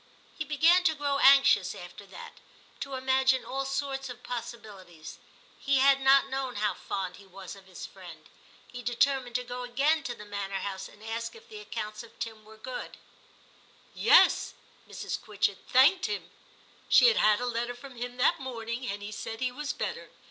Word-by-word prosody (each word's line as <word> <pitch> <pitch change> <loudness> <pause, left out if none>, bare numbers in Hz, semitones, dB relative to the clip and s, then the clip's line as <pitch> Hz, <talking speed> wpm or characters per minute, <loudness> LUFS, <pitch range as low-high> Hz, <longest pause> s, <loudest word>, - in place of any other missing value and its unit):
He 310 - -3
began 325 +5 +4
to 315 - +3
grow 285 -1 -1
anxious 275 -9 +6
after 180 +3 -11
that; 195 - -11 0.4
to 275 -1 -5
imagine 260 0 +2
all 270 +1 -3
sorts 270 -1 -3
of 245 0 -10
possibilities; 205 -9 -8 0.4
he 280 -1 +2
had 275 +1 +5
not 275 +1 +5
known 265 -2 -3
how 210 0 0
fond 190 -2 -5
he 200 - -16
was 190 0 -10
of 195 -1 -16
his 185 - -8
friend. - - -12 0.4
He 245 - -9
determined 245 0 0
to 250 - 0
go 250 0 -6
again 275 +6 +1
to 240 - -4
the 210 - -11
manor 200 -1 -5
house, 190 -1 -5
and 205 - -17
ask 230 - -4
if 460 0 -16
the 430 -1 -9
accounts 215 - -6
of 230 - -15
Tim 225 -2 -6
were 220 0 -15
good. 250 +3 -7 0.5
* - - -29 0.2
Yes - - +6
'; - - -29
Mrs. - - -5
Quitchett 210 -3 -1
* - - -29
thanked 335 - +5
him; 435 - -5 0.6
she - - +7
had 465 - +4
had 210 -1 +4
a 245 - -2
letter 240 0 -2
from 265 +1 -12
him 245 +1 -6
that 250 - +3
morning, 240 -1 -5
and 205 +1 -5
he 205 - -6
said 225 +1 -6
he 255 -1 -1
was 295 +3 -4
better. - - -5
245 Hz, 190 wpm, -29 LUFS, 215-275 Hz, 0.6 s, she